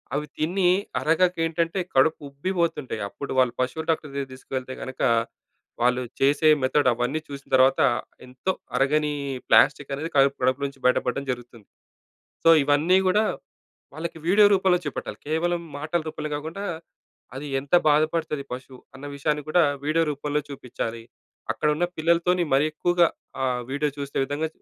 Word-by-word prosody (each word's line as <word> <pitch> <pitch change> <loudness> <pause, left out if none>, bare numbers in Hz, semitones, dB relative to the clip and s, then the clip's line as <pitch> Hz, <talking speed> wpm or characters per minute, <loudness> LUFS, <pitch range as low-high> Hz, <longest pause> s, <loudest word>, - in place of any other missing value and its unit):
అవి 150 +1 -1
తిని 175 +3 +1 0.3
అరగక 175 +3 +2
ఏంటంటే 165 +3 -1 0.2
కడుపు 160 +5 +4
ఉబ్బిపోతుంటాయి 150 - -2
అప్పుడు 140 - -7
వాళ్ళు 125 -2 +3
పశువులు 130 +6 -2
డాక్టర్ 155 -2 0
దగ్గరకి 140 -1 -4
తీసుకెళితే 130 0 -6
కనుక 130 - -7 0.8
వాళ్ళు 125 +1 +2 0.2
చేసే 145 +3 +3 0.2
మెథడ్ 135 +1 +2
అవన్నీ 125 +6 -1
చూసిన 140 -1 -9
తర్వాత 130 +4 +4 0.4
ఎంతో 130 +9 -3 0.3
అరగని 150 +2 +2 0.4
ప్లాస్టిక్ 140 0 +4
అనేది 160 +4 -4
కడుపు 140 0 +4
కడుపులో 130 +2 +1
నుంచి 135 -1 -13
బయటపడడం 125 +2 +1
జరుగుతుంది. 120 -3 -9 0.8
సో 165 - +7
ఇవన్నీ 155 +6 +4
కూడా 210 +4 +3 0.7
వాళ్ళకి 165 0 -5
వీడియో 205 +3 +6
రూపంలో 190 -2 +3
చూపట్టాలి. - - -5
కేవలం 170 +2 0 0.2
మాటల 155 +3 -1
రూపంలో 155 -1 -5
కాకుండా 160 +7 -6 0.7
అది 145 +2 -6
ఎంత 140 +3 -15 0.2
బాధపడుతది 155 -1 +1
పశువు 130 0 -8 0.2
అన్న 145 +2 -9
విషయాన్ని 150 0 -1
కూడా 175 +2 +4 0.2
వీడియో 160 +2 +2
రూపంలో 145 +1 -2
చూపించాలి. 115 -4 -5 0.5
అక్కడున్న 150 +3 0
పిల్లలతోని 170 +2 +2
మరి 140 +2 +4
ఎక్కువగా 175 +2 +3 0.4
ఆ! - - +2 0.3
వీడియో 145 +2 0
చూసే 140 0 -6
విధంగా 145 +3 -2
150 Hz, 140 wpm, -25 LUFS, 135-165 Hz, 0.8 s, సో